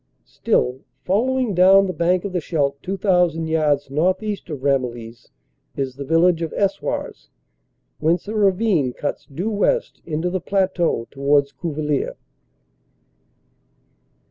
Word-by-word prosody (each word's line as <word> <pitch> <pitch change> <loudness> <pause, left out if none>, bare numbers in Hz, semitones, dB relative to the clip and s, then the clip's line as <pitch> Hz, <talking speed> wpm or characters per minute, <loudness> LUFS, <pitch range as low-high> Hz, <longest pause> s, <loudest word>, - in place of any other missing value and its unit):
Still 125 - 0 0.2
following 245 +4 +1
down 190 +2 +6
the 185 - -3
bank 175 +3 +1
of 195 - -4
the 180 - 0
Scheldt, 140 -4 -1
2,000 180 -3 +1
yards 150 -3 0
northeast 185 +6 -1
of 145 -4 -6
Ramillies 120 -4 -2 0.5
is 135 -2 -3
the 140 - -6
village 165 +3 +3
of 165 - -3
Eswars, 200 -1 -2 0.7
whence 165 +5 +1
a 215 - -4
ravine 195 - +2
cuts 145 - -4
due 180 +11 -3
west 345 - 0
into 165 +2 -2
the 185 -1 -2
plateau 185 -10 0
towards 140 0 +2
Cuvillers. 150 0 -2
165 Hz, 120 wpm, -21 LUFS, 140-190 Hz, 0.7 s, down